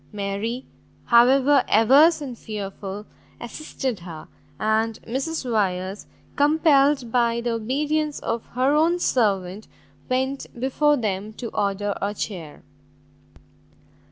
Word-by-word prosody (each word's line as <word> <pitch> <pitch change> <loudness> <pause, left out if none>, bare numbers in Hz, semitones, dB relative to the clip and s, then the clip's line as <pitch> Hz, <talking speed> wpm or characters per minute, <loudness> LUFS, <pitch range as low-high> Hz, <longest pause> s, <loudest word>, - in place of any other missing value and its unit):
Mary, 210 +5 -3 0.4
however 260 +3 +5
averse 285 +9 +5
and 265 -4 -6
fearful, 205 -2 -7 0.3
assisted 255 -2 -5
her, 170 -3 -10 0.3
and 220 +1 0
Mrs 265 +4 -3
Wyers, 195 -3 -1 0.3
compelled 290 -4 +3
by 235 -1 +2
the 235 0 -2
obedience 295 +6 -1
of 230 0 -2
her 260 +3 +2
own 325 +3 +3
servant, 205 - 0 0.4
went 265 +2 -1
before 290 +3 +2
them 210 -2 -3
to 230 +1 -6
order 205 -1 -1
a 205 +1 -2
chair. 170 -8 -6
235 Hz, 105 wpm, -23 LUFS, 205-275 Hz, 0.4 s, however